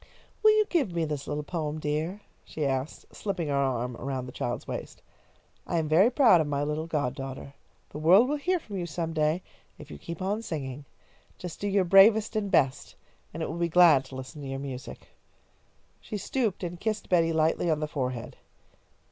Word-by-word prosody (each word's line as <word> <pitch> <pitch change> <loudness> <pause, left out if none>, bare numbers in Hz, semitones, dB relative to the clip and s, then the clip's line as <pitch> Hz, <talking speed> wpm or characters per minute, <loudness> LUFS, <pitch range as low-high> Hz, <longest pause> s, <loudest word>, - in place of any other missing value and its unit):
"Will 435 - +7
you 430 - +4
give 270 - 0
me 165 -1 +1
this 150 -2 -4
little 150 0 -3
poem, 155 -1 -3
dear?" 155 +7 -2 0.2
she 155 - -4
asked, 135 +1 -3
slipping 185 -7 -3
an - - +1
arm 125 -3 0
around 130 -1 -4
the 125 - -8
child's 120 0 -4
waist. - - -7 0.6
"I 170 - -1
am 160 -2 0
very 175 +9 +5
proud 235 - +5
of 155 - -2
my 145 -1 -1
little 150 +2 -2
god 145 -6 -1
daughter. 135 0 -7 0.4
The 150 - -6
world 185 +10 +6
will 295 +2 0
hear 360 +6 0
from 210 - -7
you 175 -2 -3
some 165 0 -3
day, 155 +3 +1 0.3
if - - -12
you 75 - -9
keep 170 - -7
on 200 +4 -1
singing. 140 - -5 0.5
Just 175 -3 -8
do 205 - -2
your 200 -1 +2
bravest 210 +5 +6
and 210 -2 -1
best, 140 -8 +1 0.4
and 160 +1 -5
it - - -1
will 165 - -5
be 170 0 +1
glad 165 -5 +6
to 130 - -11
listen 130 +4 -8
to 140 - -6
your 135 0 -4
music." 135 -2 -7 0.9
She 210 - -6
stooped 220 -2 -2
and 175 0 -5
kissed 215 0 -2
Betty 165 -2 +3
lightly 160 +2 +1
on 155 -2 +1
the 155 - -2
forehead. 125 -5 -4
160 Hz, 200 wpm, -28 LUFS, 140-190 Hz, 0.9 s, Will